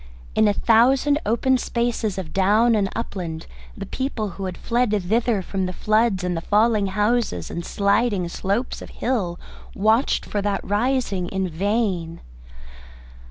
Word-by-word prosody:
In 220 - +4
a 205 - +3
thousand 260 +7 +3
open 255 +4 +2
spaces 235 -4 -1
of 175 -5 -6
down 210 +5 +3
and 200 -3 +1
upland 175 -8 -5 0.3
the 195 - -5
people 230 -2 -3
who 195 +1 -6
had 185 -2 -5
fled 240 0 0
thither 215 +2 0
from 190 0 -2
the 180 - -5
floods 215 -1 +1
and 180 -1 -1
the 165 - -3
falling 210 +1 +2
houses 210 - 0
and 170 - -4
sliding 200 -1 +1
slopes 200 +8 -2
of - - -9
hill 195 -9 -2 0.4
watched 220 +6 +2
for 205 - -2
that 200 -1 -1
rising 210 -4 0
in 190 0 -2
vain. 180 -2 -1
205 Hz, 150 wpm, -22 LUFS, 190-235 Hz, 0.4 s, In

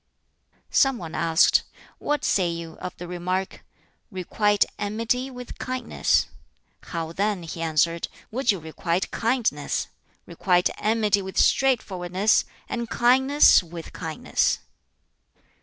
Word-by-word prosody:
Some 270 -2 +3
one 165 -6 -8
asked, 165 -1 +4 0.4
"What 295 0 -1
say 185 -3 +2
you 165 -1 -6
of 180 - -7
the 175 - -7
remark, 180 +2 -3 0.5
'Requite 205 +1 +1
enmity 230 +5 -1
with 250 -1 -10
kindness'?" 255 0 0 0.6
"How 165 -2 -4
then," 200 0 -1
he 165 0 -7
answered, 165 +1 +1 0.2
"would 245 +1 +2
you 195 - -2
requite 170 +2 -3
kindness? 230 0 -1 0.4
Requite 180 -2 +1
enmity 215 -2 +2
with 190 0 -7
straightforwardness, 200 -6 +2 0.2
and 235 -1 -4
kindness 265 +4 +5
with 170 -1 -10
kindness." - - 0
195 Hz, 110 wpm, -24 LUFS, 170-235 Hz, 0.6 s, kindness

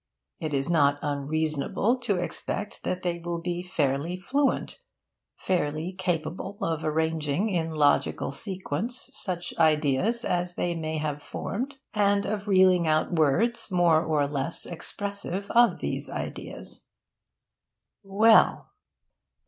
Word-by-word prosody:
It 155 - -3
is 135 0 0
not 145 -4 +3
unreasonable 155 - 0
to 215 -5 0
expect 185 +3 -3
that 185 0 -3
they 175 -1 -1
will 170 0 -4
be 175 +1 -3
fairly 160 -1 -1
fluent 275 - 0 0.6
fairly 165 -1 -1
capable 180 +1 -3
of 160 -1 -2
arranging 160 +4 0
in 170 -4 -1
logical 150 -3 +1
sequence 190 - -2
such 175 -7 -4
ideas 155 - +2
as 175 0 -1
they 175 - -1
may 160 -1 -3
have 150 -1 -3
formed, 240 - -4 0.2
and 200 -1 +2
of 205 -1 -3
reeling 185 -3 +5
out 155 0 +2
words 220 - +2
more 170 -3 +4
or 155 -3 +1
less 140 +3 -2
expressive 200 +2 -3
of 240 0 +4
these - - -2
ideas. - - -7 1.1
Well! 215 +3 +4
175 Hz, 120 wpm, -27 LUFS, 155-200 Hz, 1.1 s, reeling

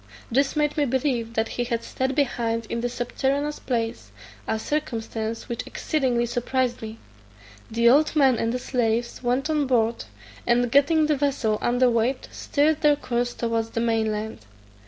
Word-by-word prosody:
This 275 +5 +2
made 300 0 +1
me 295 - +3
believe 245 -3 -1
that 225 0 +1
he 245 - -2
had 235 -1 -2
staid 260 0 -2
behind 230 -5 0
in 235 - -1
the 245 - -1
subterraneous 275 +4 -1
place, 230 -2 -3 0.4
a 220 - 0
circumstance 225 -4 -3
which 235 - -4
exceedingly 255 -6 0
surprised 245 +1 -1
me. 220 0 -7 0.7
The 235 +1 +2
old 295 +6 +5
man 270 -5 +4
and 230 - 0
the 250 - -1
slaves 235 -2 -1
went 250 +3 0
on 300 -3 +1
board, 230 - +1 0.4
and 240 0 +2
getting 295 +3 +4
the 300 0 +2
vessel 265 -6 0
under 245 +1 +3
weigh, 240 +2 +2
steered 305 +2 +1
their 295 -1 +5
course 245 -3 -2
towards 230 -1 -1
the 230 - -3
main 225 -2 +1
land. 215 - -4
245 Hz, 165 wpm, -24 LUFS, 230-275 Hz, 0.7 s, old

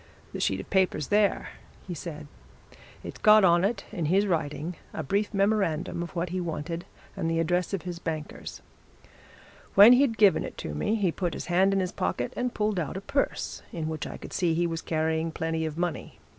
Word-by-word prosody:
"The - - -4
sheet - - 0
of - - -7
paper's 185 -6 +1
there," 205 -1 +2 0.4
he 180 - -5
said. 155 -2 -7 0.8
"It's - - -8
got 215 -1 +7
on 175 -1 +5
it, 200 0 -1
in 175 -7 -3
his 190 +6 +3
writing, 165 -1 -2 0.2
a 160 - -3
brief 200 +9 0
memorandum 195 -5 0
of 170 +2 -6
what 170 +1 -1
he 185 +1 -2
wanted 165 0 -4 0.3
and 165 - -2
the 165 - 0
address 175 +2 0
of 195 -3 -3
his 175 -1 -5
bankers. 155 -3 -6 1.1
When 205 +5 +10
he'd 250 -3 +3
given 200 -5 +5
it - - -7
to 75 - -5
me, 75 - 0
he 195 -6 +1
put 175 -1 -3
his - - -5
hand 190 +2 +4
in 195 - +2
his 185 -1 -1
pocket 120 +8 -2
and 250 0 -1
pulled 210 -4 0
out 160 +2 -3
a - - -5
purse 275 +7 -2
in 160 -2 -4
which 160 -1 -4
I - - -7
could - - -10
see 170 -3 +1
he 175 +1 +1
was 165 -1 -2
carrying 160 0 -1
plenty 160 0 -2
of 155 0 -6
money. 175 -1 -3
175 Hz, 205 wpm, -27 LUFS, 160-195 Hz, 1.1 s, When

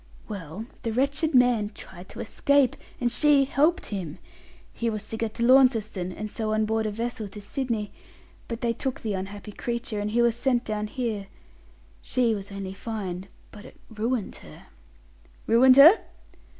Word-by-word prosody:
"Well, 195 +1 -7 0.2
the 230 - -2
wretched 280 +6 0
man 245 -4 +4
tried 185 0 -11
to - - -7
escape, 280 +3 +2 0.2
and 240 -1 0
she 285 +1 +4
helped 300 +6 +2
him. 175 -6 -5 0.6
He 235 - -1
was 215 -1 -5
to - - -4
get 220 -1 -3
to 235 - -2
Launceston, 230 -8 +3
and 215 +3 -6
so 215 -1 -2
on 215 0 +2
board 220 0 0
a - - -2
vessel 230 0 -4
to 200 +2 -10
Sydney; 225 -1 -3 0.6
but 230 0 -5
they 235 -1 +1
took 260 +2 -3
the 215 -2 -2
unhappy 200 +2 -6
creature, 235 0 -4
and 205 +1 -2
he 240 +2 +2
was 235 -1 +3
sent 245 0 0
down 210 -1 -2
here. 215 -4 -3 0.7
She 245 -3 +1
was 200 -1 -6
only 195 -1 -6
fined, 195 -3 -5 0.2
but 210 -2 -12
it - - -15
ruined 220 0 -2
her." - - -14 0.8
"Ruined 255 +3 +6
her?" 320 +10 +9
225 Hz, 170 wpm, -26 LUFS, 205-250 Hz, 0.8 s, her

